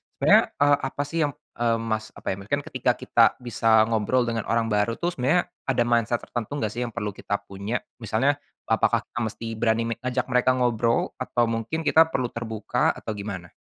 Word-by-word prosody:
Sebenarnya - - +6 0.2
e - - +5 0.2
apa 140 - -4
sih 165 - -4
yam - - -4 0.3
eee 115 -1 +2 0.2
Mas 110 0 0
apa - - -13
ya, - - -1
mungkin 125 +9 -1
ketika - - 0
kita - - +1 0.2
bisa 115 -1 -2 0.2
ngobrol 115 +3 +2
dengan 115 -2 -2
orang 115 -1 +1
baru 105 +2 +1
tuh 175 +1 -1
sebenarnya 160 +5 +2 0.2
ada 125 -3 +2
mindset 120 0 +1
tertentu 120 -1 -5
nggak 110 -7 -1
sih 120 - -4
yang 115 - -9
perlu 105 0 -2
kita 100 - -3
punya? 100 +5 -4 0.2
Misalnya, 115 +4 +2 0.4
apakah - - +2
kita - - -7
mesti 115 +1 -7
berani 115 0 +2
me - - +2
ngajak 125 0 -1
mereka 125 +1 +3
ngobrol? 120 -2 +1
Atau 120 -2 0
mungkin 115 +8 -2
kita 160 +1 +5
perlu 130 -6 -2
terbuka? 110 -2 -1
Atau 110 - -6
gimana? 95 -4 -6
115 Hz, 195 wpm, -25 LUFS, 110-125 Hz, 0.4 s, Sebenarnya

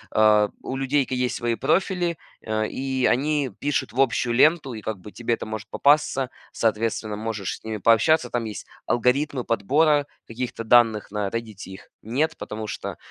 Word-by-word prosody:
э, 105 -1 +5
у 130 - -5
людей 135 +1 +1
ки 130 - -3
есть 125 0 -1
свои 120 -1 -1
профили, 175 - 0 0.2
э, 110 -1 -1
и 130 -1 -2
они 145 +1 +1
пишут 145 -5 -1
в 130 - -5
общую 125 -2 +2
ленту 150 -2 +4
и 110 - -7
как 110 -3 -4
бы 105 +3 -11
тебе 120 0 -2
это 115 - -4
может 110 0 -6
попасться, 140 -3 +2 0.2
соответственно, 110 -1 -1
можешь 110 -2 -4
с - - -26
ними 110 -1 -4
пообщаться. 120 - +3
Там 120 -1 -1
есть 105 - -7 0.2
алгоритмы 125 +2 +1
подбора 145 +7 +2 0.2
каких-то 115 0 -5
данных, 115 -2 +4
на 105 -1 -2
"Реддите" 110 -5 -6
их 95 - -12
нет, 145 +9 -1
потому 110 0 -6
что - - -5
120 Hz, 175 wpm, -24 LUFS, 110-135 Hz, 0.2 s, э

